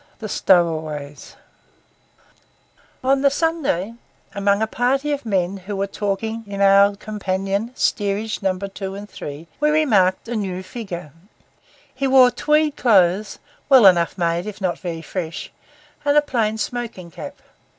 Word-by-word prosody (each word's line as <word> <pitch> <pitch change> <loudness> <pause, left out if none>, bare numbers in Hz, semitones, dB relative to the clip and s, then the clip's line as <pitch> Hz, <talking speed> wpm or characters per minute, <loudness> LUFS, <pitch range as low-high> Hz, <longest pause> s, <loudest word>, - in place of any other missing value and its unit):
THE 220 - -6
STOWAWAYS 155 -7 0 1.7
On 270 +1 +2
the 280 - +5
Sunday, 280 - -1 0.4
among 200 0 +1
a - - +3
party 265 +6 0
of 285 -4 -3
men 190 -2 0
who 195 +2 -6
were 195 0 0
talking 215 +3 -3
in 200 -1 -6
our 200 +1 +5
companion, 200 +1 -3
Steerage 210 0 -1
No. 190 -2 0
2 195 0 -6
and 205 +1 -8
3, 155 -4 -8
we 300 +1 +3
remarked 225 -12 +2
a 240 - -3
new 190 -3 -3
figure. 185 - -7 0.8
He 275 - -1
wore 260 -2 +6
tweed 300 +4 +1
clothes, 195 -3 +3 0.3
well 260 -6 +7
enough 175 -1 +4
made 170 +1 0
if 210 -1 -7
not 185 -3 -2
very 165 -3 -5
fresh, 165 0 -5 0.5
and 290 0 +3
a - - +7
plain 225 -6 -1
smoking 220 -7 -5
cap. 285 - -8
200 Hz, 140 wpm, -21 LUFS, 185-240 Hz, 1.7 s, well